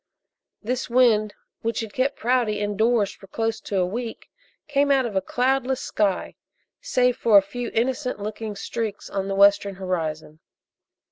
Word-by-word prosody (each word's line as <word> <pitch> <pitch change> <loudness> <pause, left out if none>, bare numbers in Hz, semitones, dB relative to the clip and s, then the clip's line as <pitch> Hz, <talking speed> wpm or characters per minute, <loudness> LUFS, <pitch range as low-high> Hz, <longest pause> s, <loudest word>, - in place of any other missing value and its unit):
This 250 +4 -2
wind 230 -4 +3 0.3
which 230 +1 -1
had 220 -2 -7
kept 265 +2 0
Prouty 235 -3 +1
indoors 210 +1 +1
for 195 - -16
close 225 +3 -2
to 200 - -3
a 180 - +3
week 230 +5 -6 0.4
came 285 -1 +2
out 270 -2 +3
of 220 -4 -4
a 190 - +2
cloudless 260 +4 0
sky, 200 -3 -1 0.5
save 250 - +2
for 220 -3 +5
a - - +8
few 240 +4 -5
innocent 250 +1 0
looking 215 +1 -5
streaks 220 0 -4
on 195 -1 -2
the 195 - -2
western 200 0 +4
horizon. 160 -5 -4
225 Hz, 155 wpm, -24 LUFS, 200-250 Hz, 0.5 s, a